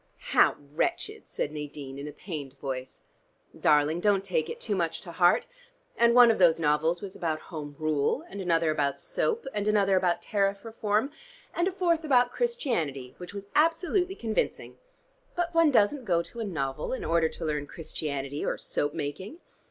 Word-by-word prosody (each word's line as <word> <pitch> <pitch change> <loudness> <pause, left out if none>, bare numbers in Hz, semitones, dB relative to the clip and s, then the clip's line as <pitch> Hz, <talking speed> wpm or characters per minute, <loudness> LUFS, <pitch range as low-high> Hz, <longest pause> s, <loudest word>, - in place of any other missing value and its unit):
"How - - +5 0.2
wretched!" 405 - -2
said 150 - -3
Nadine 145 -2 -7
in 145 - -6
a - - -6
pained 145 -7 -7
voice. 130 -1 -6 0.5
"Darling, 150 +3 +3
don't 200 0 +2
take 180 -5 -1
it - - -6
too 210 - -1
much 170 -3 -1
to 175 - -8
heart. 175 +1 +4 0.5
And 235 0 +4
one 245 -2 +9
of 220 - -1
those 170 -3 +5
novels 160 +4 +1
was 195 -2 -7
about 160 -2 -2
Home 145 -2 -6
Rule 155 - 0
and 200 - -7
another 165 -3 +2
about 145 -2 0
Soap, 465 0 -1
and 205 0 -2
another 200 -2 +3
about 180 -2 +1
Tariff 200 0 0
Reform, 220 +3 0 0.4
and 345 +1 +1
a - - 0
fourth 345 -3 +1
about 250 -5 +3
Christianity, 195 - -2
which 180 +3 -9
was 200 0 -6
absolutely 355 +4 +2
convincing. 225 - -2 0.6
But 350 -1 -1
one 330 -2 +5
doesn't 255 +2 +3
go 170 -4 +2
to 235 - -10
a 225 - -2
novel 140 - -3
in 260 - -4
order 165 -1 +2
to 165 - -7
learn 150 -2 -2
Christianity, 145 -3 -4
or - - -1
soap 145 +2 -2
making. 165 - -5
180 Hz, 175 wpm, -28 LUFS, 150-235 Hz, 0.6 s, one